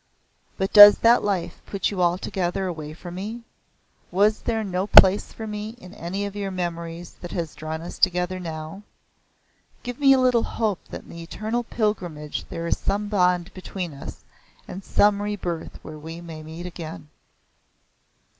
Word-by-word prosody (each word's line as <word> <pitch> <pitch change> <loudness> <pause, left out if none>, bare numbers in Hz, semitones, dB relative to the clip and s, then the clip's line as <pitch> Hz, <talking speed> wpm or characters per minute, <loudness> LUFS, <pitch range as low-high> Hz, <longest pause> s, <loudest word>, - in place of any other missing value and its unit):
But 190 0 -2
does 205 -1 +11
that 235 +1 +5
life 180 -4 -2
put 200 -1 -1
you 190 -3 -2
altogether 180 +1 0
away 155 -4 -5
from 175 0 -9
me? 215 +6 -6 0.7
Was 205 +4 +3
there 225 -2 -1
no 190 -1 -2
place 195 0 +7
for 220 - -7
me 210 +1 -5
in 185 -5 -13
any 195 +2 -4
of 200 0 -6
your 200 -1 -3
memories 170 -2 -5
that 175 - -7
has 165 -4 -3
drawn 155 +1 -5
us 175 - -8
together 180 0 +1
now? 160 +2 -6 1.0
Give 245 +1 -6
me 275 -1 +6
a 265 - +4
little 250 -2 +4
hope 215 -6 -1
that - - -7
in - - -19
the 170 - -9
eternal 215 +8 -3
pilgrimage 180 -10 -3
there 165 - -5
is 170 - 0
some 205 +1 -1
bond 180 -2 +1
between 185 -3 -6
us 140 - -10 0.4
and 195 - -7
some 205 +1 +3
rebirth 190 -5 -4
where 155 -1 -9
we 165 +2 -8
may 165 -2 -9
met 160 +3 -8
again." 155 - -8
185 Hz, 165 wpm, -24 LUFS, 170-205 Hz, 1.0 s, does